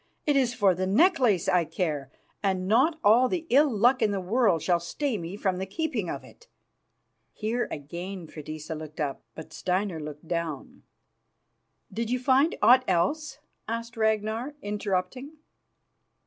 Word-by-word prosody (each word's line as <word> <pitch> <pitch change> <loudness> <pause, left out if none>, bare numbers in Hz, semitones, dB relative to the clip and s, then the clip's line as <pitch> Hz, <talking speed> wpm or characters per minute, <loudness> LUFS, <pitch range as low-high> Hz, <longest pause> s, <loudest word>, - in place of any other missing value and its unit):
It 295 - +2
is 255 -3 +2
for 200 -5 +4
the 185 +1 -2
necklace 240 - +3
I 180 -1 +3
care, 150 -5 -3 0.3
and 190 -2 0
not 265 - +3
all 235 +5 +5
the 345 -3 -2
ill 285 +4 +5
luck 245 +3 +3
in 220 - +3
the 200 -1 -1
world 190 -3 +2
shall 175 -2 +2
stay 260 - -2
me 175 0 -5
from 190 -3 0
the 190 +1 -4
keeping 320 - -2
of - - -5
it." 475 - -18 0.9
Here 230 +3 -2
again 175 +5 -6
Freydisa 155 0 -7
looked 155 0 -9
up, 145 -3 -2
but 160 - -10
Steinar 185 -2 -1
looked 150 +1 -8
down. 170 -5 -4 1.1
"Did 230 0 -2
you 250 - +1
find 265 +5 +3
aught 255 +2 +7
else?" 275 - 0 0.3
asked 230 +1 -4
Ragnar, 220 +5 0
interrupting. 205 +7 -3
205 Hz, 150 wpm, -27 LUFS, 175-250 Hz, 1.1 s, aught